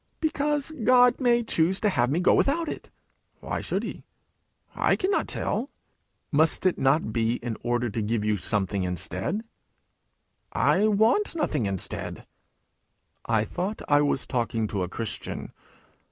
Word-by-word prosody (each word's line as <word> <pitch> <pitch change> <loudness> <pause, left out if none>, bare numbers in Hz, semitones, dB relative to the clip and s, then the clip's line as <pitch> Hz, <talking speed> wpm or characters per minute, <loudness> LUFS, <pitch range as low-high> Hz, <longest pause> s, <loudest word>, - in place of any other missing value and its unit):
'Because 295 -1 0
God 250 +1 +5
may 240 -1 +3
choose 185 -3 +1
to 215 - +3
have 125 -9 +1
me 155 +5 +1
go 180 - +4
without 330 +4 +2
it.' - - -6 0.5
'Why - - -4
should - - -2
he?' - - -6 0.7
'I - - +2
cannot 390 +2 0
tell.' 240 +7 -2 0.6
'Must 160 +4 +3
it 185 - +2
not 135 -4 +2
be 115 +1 +1
in 120 -2 -4
order 120 0 0
to 110 - -2
give 105 0 -1
you 105 0 +2
something 100 +1 -1
instead?' 90 - -2 1.1
'I 210 +3 +3
want 220 - +2
nothing 295 - 0
instead.' 95 -2 -3 1.0
'I 110 -2 +2
thought 190 - -4
I 145 0 +4
was 145 -2 +1
talking 115 -2 -1
to 100 - -2
a 90 - -2
Christian!' 115 +2 -4
145 Hz, 145 wpm, -26 LUFS, -, 1.1 s, God